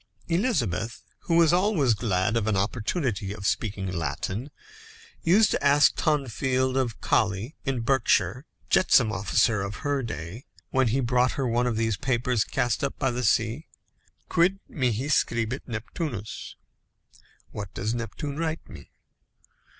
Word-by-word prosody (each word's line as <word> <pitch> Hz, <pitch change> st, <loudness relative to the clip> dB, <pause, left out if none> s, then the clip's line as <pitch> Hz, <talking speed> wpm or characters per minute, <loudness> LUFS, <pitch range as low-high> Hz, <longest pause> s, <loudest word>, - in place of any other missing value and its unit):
Elizabeth, 140 Hz, -, 0 dB, 0.2 s
who 170 Hz, -4 st, +1 dB
was 165 Hz, -1 st, +5 dB
always 175 Hz, -, +3 dB
glad 100 Hz, -1 st, 0 dB
of 115 Hz, -2 st, 0 dB
an 105 Hz, -3 st, +1 dB
opportunity 105 Hz, -, -1 dB
of 100 Hz, -1 st, -8 dB
speaking 100 Hz, 0 st, -1 dB
Latin, 95 Hz, -, -3 dB, 0.7 s
used 205 Hz, +6 st, +4 dB
to -, -, -1 dB
ask 145 Hz, +1 st, +5 dB
Tonfield, 130 Hz, -, 0 dB
of 125 Hz, -5 st, -1 dB
Coley 105 Hz, -, 0 dB
in 130 Hz, -3 st, -1 dB
Berkshire, 130 Hz, +2 st, +1 dB, 0.2 s
jetsam 125 Hz, -11 st, +4 dB
officer 105 Hz, +2 st, +2 dB
of 100 Hz, +1 st, -4 dB
her 145 Hz, -1 st, +1 dB
day, 100 Hz, -, -6 dB, 0.3 s
when 130 Hz, -1 st, +3 dB
he 130 Hz, +5 st, +1 dB
brought 125 Hz, 0 st, +2 dB
her 135 Hz, -2 st, -1 dB
one 120 Hz, +1 st, +1 dB
of 120 Hz, -, 0 dB
these 110 Hz, -3 st, 0 dB
papers 125 Hz, -2 st, +1 dB
cast 120 Hz, +1 st, -1 dB
up 140 Hz, -, -2 dB
by 130 Hz, -2 st, 0 dB
the 125 Hz, +1 st, -3 dB
sea, 115 Hz, +6 st, +1 dB, 0.6 s
"Quid 185 Hz, +4 st, +2 dB
mihi 125 Hz, -1 st, -1 dB
scribit 115 Hz, -3 st, 0 dB
Neptunus?" 110 Hz, -, -5 dB, 1.0 s
(What 100 Hz, -2 st, -6 dB
does 110 Hz, +1 st, -2 dB
Neptune 120 Hz, +5 st, -5 dB
write 165 Hz, -1 st, -3 dB
me?) 70 Hz, -, -12 dB
120 Hz, 140 wpm, -26 LUFS, 110-140 Hz, 1.0 s, was